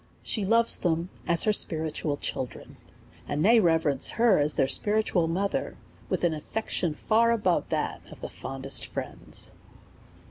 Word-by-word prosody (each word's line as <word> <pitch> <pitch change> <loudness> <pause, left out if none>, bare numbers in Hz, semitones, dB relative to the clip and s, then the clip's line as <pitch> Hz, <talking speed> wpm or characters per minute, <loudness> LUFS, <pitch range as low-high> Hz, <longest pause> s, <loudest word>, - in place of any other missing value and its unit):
She 210 -4 -1
loves 230 +3 +3
them 170 0 -1 0.2
as 170 -2 +4
her 215 - +2
spiritual 155 -5 0
children, 130 -3 -5 0.5
and 150 +4 -1
they 230 +2 +6
reverence 160 -7 +2
her 230 -6 +4
as 145 +1 +2
their 135 - +2
spiritual 205 -1 +2
mother, 195 +4 -2 0.3
with - - -2
an 170 -2 +2
af 155 - -6
fection 180 -7 -2
far 230 +7 +2
above 210 -7 +1
that - - -2
of - - -12
the - - -4
fondest 135 +1 -4
friends. - - -6
175 Hz, 150 wpm, -27 LUFS, 155-215 Hz, 0.5 s, they